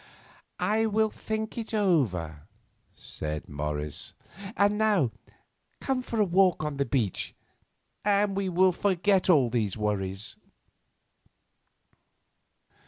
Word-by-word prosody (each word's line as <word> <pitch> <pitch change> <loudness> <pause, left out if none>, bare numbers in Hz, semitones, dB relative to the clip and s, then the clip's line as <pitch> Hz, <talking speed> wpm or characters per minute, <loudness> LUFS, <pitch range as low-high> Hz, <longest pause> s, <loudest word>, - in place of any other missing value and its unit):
"I 215 +5 +2
will 220 0 +2
think 220 +1 -4
it 225 0 -4
over," 100 - 0 0.4
said 75 -1 -6
Morris. 75 0 -4 0.4
"And 205 +1 +4
now 210 - +2 0.7
come 265 -1 -1
for 230 -3 -4
a 210 - +5
walk 185 -2 +3
on 150 -2 -3
the 140 - 0
beach, 115 -9 -1 0.7
and 200 -1 +2
we 195 -1 -1
will 185 +1 +4
forget 190 +1 +1
all 135 -9 +5
these 110 -5 -1
worries." 100 -1 -2
180 Hz, 105 wpm, -28 LUFS, -, 0.7 s, a